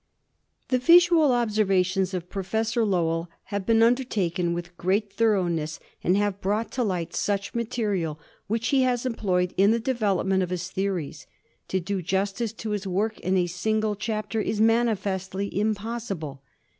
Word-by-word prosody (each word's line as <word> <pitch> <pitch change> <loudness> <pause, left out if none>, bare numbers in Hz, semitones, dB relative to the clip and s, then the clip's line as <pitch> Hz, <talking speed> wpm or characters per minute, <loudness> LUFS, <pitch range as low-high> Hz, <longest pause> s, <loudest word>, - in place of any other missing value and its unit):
The 255 - +2
visual 335 0 +6
observations 195 -5 +1
of 180 -1 -4
Professor 220 +5 -1
Lowell 170 -4 0 0.2
have 200 -2 -2
been 225 0 +5
undertaken 205 -8 +1
with 175 +1 -5
great 195 +4 0
thoroness 175 -8 +1 0.2
and 180 +2 +3
have 205 -1 0
brought 210 +4 -1
to 250 - -1
light 180 -6 -2
much 200 -1 -1
material 210 -9 -2 0.3
which 225 +3 -1
he 275 -2 +3
has 250 -1 +1
employed 185 -7 0
in 195 +2 +5
the 230 +1 +3
development 200 -6 +1
of 180 - -1
his 180 +1 -4
theories. 190 -6 -3 0.4
To 190 - 0
do 190 +2 -3
justice 195 +5 -1
to 225 -1 -5
his 205 -1 -2
work 205 +4 -1
in 190 +1 0
a 180 - +3
single 215 +4 -1
chapter 215 +1 -2
is 210 - -2
manifestly 200 -4 +1
impossible. 205 - -3
200 Hz, 150 wpm, -26 LUFS, 185-225 Hz, 0.4 s, visual